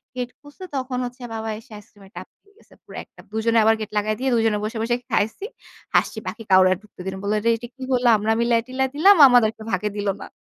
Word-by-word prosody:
Gate 250 -1 -3
খুলছে 290 +5 -14
তখন 255 -1 -3
হচ্ছে 245 +1 -9
বাবা 220 0 -5
আইসক্রিমের 210 -3 -14
টাব - - -7 0.2
দিয়ে 405 0 -28
গেছে - - -23
পুড়া - - -9
একটা, - - -26
দুজনে 225 +1 0
আবার 225 +1 +4
গেট 215 - -5
লাগায়ে 215 +1 0
দিয়ে 265 0 0
দুজনে 225 -2 +2
বসে, 220 +2 -4
বসে 240 +1 0 0.2
খাইছি, 220 - -1 0.5
হাসছি - - +2
বাকি 225 - -6
কাউরে 185 0 +7
আর - - -5
ঢুকতে 210 - -23
দেইনা। 190 0 -4
বলল, 205 +1 -1 0.2
"এটা 240 +1 -9
কি 270 - -18
হলো 245 -1 +2
আমরা 215 +2 -1
মিলায়-টিলায় 245 +3 0
দিলাম, 390 +7 +6
আমাদেরকে 225 -3 +3
ভাগে 190 +3 -1
দিল 205 0 -3
না।" - - -9
225 Hz, 215 wpm, -22 LUFS, 210-250 Hz, 0.5 s, কাউরে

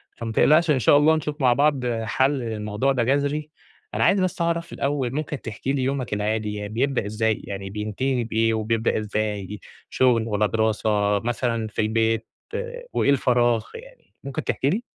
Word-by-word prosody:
فما 115 -1 -5
تقلقش 155 +7 +4
إن 135 - +2
شاء 125 +5 +5
الله 155 +2 +5
نشوف 150 -1 -4
مع 125 -2 +5
بعض 140 -2 +2 0.2
حَل 130 +5 +2
للموضوع 110 +2 -1
ده 125 -3 +1
جَذري، 145 +4 0 0.4
أنا - - +1
عايز 195 - +4
بس 185 -1 -1
أعرف 170 0 -1
الأول 140 -3 -1
ممكن 150 -1 -3
تحكي 115 +5 -3
لي 135 -2 0
يومك 130 -4 -2
العادي، 105 0 -1
ي 105 - -4
بيبدأ 125 +2 0
إزاي 110 +1 0
يعني 95 -1 -6
بينتهي 110 +5 -2
بإيه، 115 0 +1
وبيبدأ 110 +1 0
إزاي 105 -1 -3 0.3
شغل، 120 -3 +2
والّا 105 -1 +1
دراسة، 105 -2 +1
مثلًا 115 0 -1
في 105 - -2
البيت، 110 +1 +1 0.7
وإيه - - +2
الفراغ، 120 -4 +2
يعني - - -14
ممكن 135 -1 -4
تحكي 135 - 0
لي؟ 210 +9 -1
120 Hz, 170 wpm, -24 LUFS, 110-140 Hz, 0.7 s, شاء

